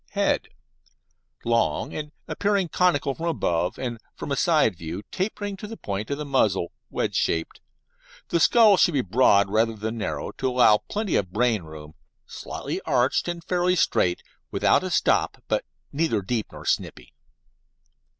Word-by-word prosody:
HEAD - - +1 1.0
Long, 115 0 0
and 150 -1 -5 0.2
appearing 200 -3 0
conical 150 -6 +2
from 165 +5 -5
above, 90 - 0
and 120 -3 -4 0.2
from - - -6
a - - +2
side 150 - +3
view, 85 +4 -6
tapering 205 +1 -3
to 210 - -8
the 225 +1 -8
point 100 +1 -4
of 140 - -2
the 150 - -5
muzzle, 105 -11 +1 0.2
wedge - - -2
shaped. 80 0 -1 0.7
The 170 - +1
skull 215 +2 +6
should 175 - +3
be 135 - +3
broad 100 -2 +3
rather 110 +1 +2
than 110 +2 -4
narrow, 75 -8 -3
to 130 - +1
allow 125 -4 +5
plenty 210 -3 -1
of 95 -3 -2
brain 115 0 +1
room, 80 -1 -11 0.3
slightly - - -6
arched, 125 +7 +1
and 170 -1 -4
fairly 180 +1 +1
straight, 90 - +1 0.3
without - - +2
a - - -3
stop, - - +1
but - - 0 0.3
not 140 - 0
deep 110 +1 -1
or - - -11
snipy. - - -2
125 Hz, 160 wpm, -25 LUFS, 100-170 Hz, 1.0 s, skull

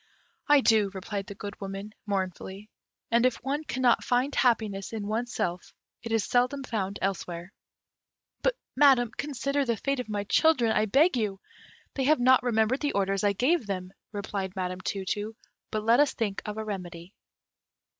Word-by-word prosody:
"I 295 -2 +6
do," 220 -5 +4
replied 195 +1 -4
the 200 - -8
Good 205 0 -8
Woman, 195 +2 -6
mournfully; 195 +1 -4 0.4
"and 235 +1 +4
if 255 -1 +3
one 285 +4 -1
cannot 255 -4 +2
find 250 +3 +1
happiness 220 -6 +1
in 215 -2 -3
one's 230 +3 -2
self, 175 -4 -3 0.3
it 230 - -6
is 225 -2 +2
seldom 250 +5 +1
found 200 -5 -3
elsewhere. 180 -1 -3 0.9
But, - - +2 0.2
Madam, 260 -4 +5
consider 280 0 -1
the 235 -4 0
fate 275 +4 -1
of 250 - -5
my 205 -1 -2
children, 245 0 +3
I 215 0 +2
beg 285 - +4
of - - +1
you!" 200 -3 -2 0.5
"They 270 - -1
have 305 +1 +4
not 255 +1 +5
remembered 235 +1 +1
the 290 - -1
orders 195 0 0
I 205 -1 +3
gave 255 - +1
them," 185 -1 -4 0.2
replied 200 -2 -4
Madame 185 -1 -3
Tu 195 0 -3
tu; 210 +3 -3 0.3
"but 215 -1 -2
let 230 +3 +4
us 290 -1 +3
think 205 -4 -2
of 210 0 -4
a 220 - -3
remedy." 180 -3 -6
220 Hz, 175 wpm, -28 LUFS, 195-255 Hz, 0.9 s, I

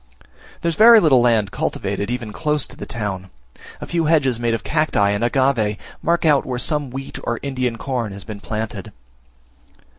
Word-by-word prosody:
There - - -2
is - - -1
very 225 +4 +8
little 140 - +4
land 115 -5 +2
cultivated 100 - -3
even 120 -3 -4
close 150 +1 0
to - - -13
the - - -8
town. 95 -4 -4 0.5
A - - -6
few 170 -2 -1
hedges, 140 -7 +2
made 120 -1 0
of 115 - -6
cacti 150 -10 +1
and 100 +2 -1
agave, 120 -4 +1 0.2
mark 170 +1 +1
out 150 -3 +4
where 125 -1 -4
some 145 +2 -1
wheat 135 +2 -7
or 120 - -2
Indian 130 -4 -2
corn 120 -5 -3
has 100 0 -8
been 105 -1 -8
planted. 110 +2 -5
125 Hz, 180 wpm, -20 LUFS, 110-150 Hz, 0.5 s, very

